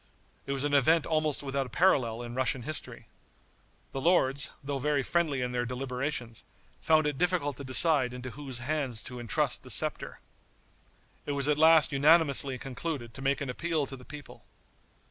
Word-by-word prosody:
It - - -3
was 135 0 -2
an 145 0 -1
event 155 +3 +3
almost 155 -3 -1
without 135 -1 -2
a - - -12
parallel 120 -6 +1
in 120 0 -7
Russian 130 0 0
history. 155 +3 -6 0.9
The 135 - -5
lords, 140 -5 +2
though 140 0 -3
very 145 0 0
friendly 150 -5 0
in 125 - -3
their 120 0 -1
deliberations, 125 -1 -4 0.4
found 155 -1 +3
it 150 -2 -2
difficult 175 -6 0
to 140 - -8
decide 130 0 +3
into 125 0 -7
whose 135 -3 -8
hands 140 -6 -2
to 125 -1 -7
intrust 115 -2 -1
the - - -13
scepter. - - +2 1.1
It 145 - -1
was 140 0 +1
at 150 0 +1
last 160 -1 +5
unanimously 140 -2 +3
concluded 130 -2 -6
to 135 - -9
make 135 +1 0
an 140 - -4
appeal 160 +2 -2
to 135 - -7
the 125 - -14
people. 145 +2 -12
140 Hz, 175 wpm, -29 LUFS, 125-150 Hz, 1.1 s, last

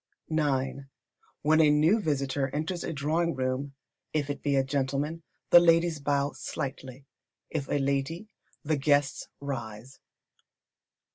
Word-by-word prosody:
ix. 140 -4 0 0.6
When 155 +2 +5
a 155 - +6
new 155 +9 +4
visitor 140 -5 -1
enters 160 +4 -2
a - - -3
drawing 160 +3 0
room, 130 +2 -2 0.4
if 145 -2 0
it 145 - -6
be 145 -1 +1
a 135 - +3
gentleman, 140 +4 -2 0.3
the 175 - +11
ladies 165 -1 +3
bow 140 0 0
slightly, 135 0 -6 0.5
if 145 -4 -2
a - - +1
lady, 140 +8 -1 0.4
the 155 0 0
guests 145 0 +1
rise. 125 -3 -6
145 Hz, 130 wpm, -28 LUFS, 135-155 Hz, 0.6 s, the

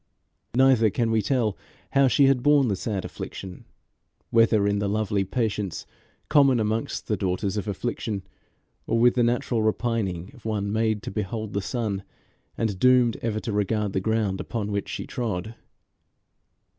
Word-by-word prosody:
Neither 130 -4 +5
can 115 +3 0
we 110 -1 +3
tell 110 -2 0 0.4
how 135 0 +4
she 140 +2 +4
had 135 -2 +3
borne 145 -2 +4
the 100 - +1
sad 95 -1 -3
affliction; 95 -2 -8 0.7
whether 115 -3 +4
in 100 0 +1
the 100 0 -1
lovely 105 -1 0
patience 105 -3 -2 0.4
common 140 -5 +5
amongst 110 +1 -2
the 105 - +1
daughters 95 0 -1
of 105 0 -3
affliction, 105 -1 -3 0.6
or 115 - +1
with 120 +1 +5
the 125 - +1
natural 120 -1 +1
repining 110 -5 -1
of 125 - -17
one 105 -2 -2
made 110 -1 0
to - - -5
behold 105 +1 -4
the 100 - 0
sun, 105 -2 -2 0.6
and 105 -5 -1
doomed 125 -1 +4
ever 110 -2 -2
to 115 - -4
regard 105 0 0
the 95 - 0
ground 110 -2 0
upon 105 -3 -4
which 100 0 -2
she - - -4
trod. 110 -3 -3
110 Hz, 160 wpm, -25 LUFS, 100-120 Hz, 0.7 s, Neither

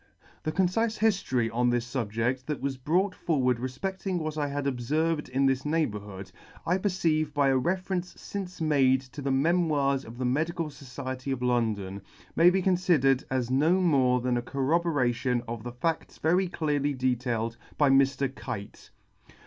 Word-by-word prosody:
The 155 - -2
concife 205 +6 +1
hiftory 130 - +1
on 125 +1 +2
this 120 +1 -1
fubjedt 120 +2 -1
that 150 -2 -2
was 140 -1 -2
brought 175 +9 +1
forward 130 -9 0
refpedting 185 +9 -3
what 155 -2 -3
I 150 -2 -1
had 140 0 -3
obferved 150 +5 0
in 135 +2 +1
this 135 0 +2
neighbourhood*, 105 - -2 0.3
I 180 +3 +1
perceive 165 -6 0
by 140 -1 +3
a 135 - +3
reference 180 +4 -2
fince 190 -3 -7
made 135 -5 +3
to 135 +2 -10
the 140 - -2
Memoirs 140 -2 +2
of 115 +1 -11
the 130 - -2
Medical 160 +5 -1
Society 130 -1 -7
of 130 -2 -2
London, 110 -6 0 0.3
may 170 +2 +7
be 185 +1 +1
conlidered 170 -8 +3
as 130 -2 -1
no 155 +8 +3
more 130 -8 +3
than 125 0 0
a - - 0
corroboration 130 -3 0
of 115 -1 -5
the 120 +2 -6
fadts 160 +7 -3
very 180 +4 +2
clearly 145 -4 -1
detailed 120 -3 -1 0.2
by 145 -2 +4
Mr. 135 0 +3
Kite 100 -5 -7 0.4
■f. - - -30
140 Hz, 165 wpm, -28 LUFS, 125-165 Hz, 0.4 s, may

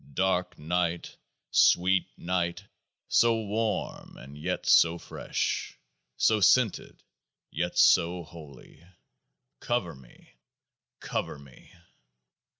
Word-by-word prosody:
Dark 95 -1 0
night, 85 +2 -2 0.4
sweet 90 +1 +3
night, 85 +1 -2 0.4
so 115 -1 +3
warm 110 +1 -3
and 70 +2 -12
yet 75 - -4
so 85 +1 +5
fresh, - - -4 0.4
so 110 -1 +3
scented 110 +2 +2 0.5
yet - - -3
so 85 +1 +4
holy, 75 -2 -14 0.8
cover 120 -8 -2
me, 65 -2 -19 0.7
cover - - -4
me 70 -2 -17
90 Hz, 90 wpm, -27 LUFS, 80-100 Hz, 0.8 s, so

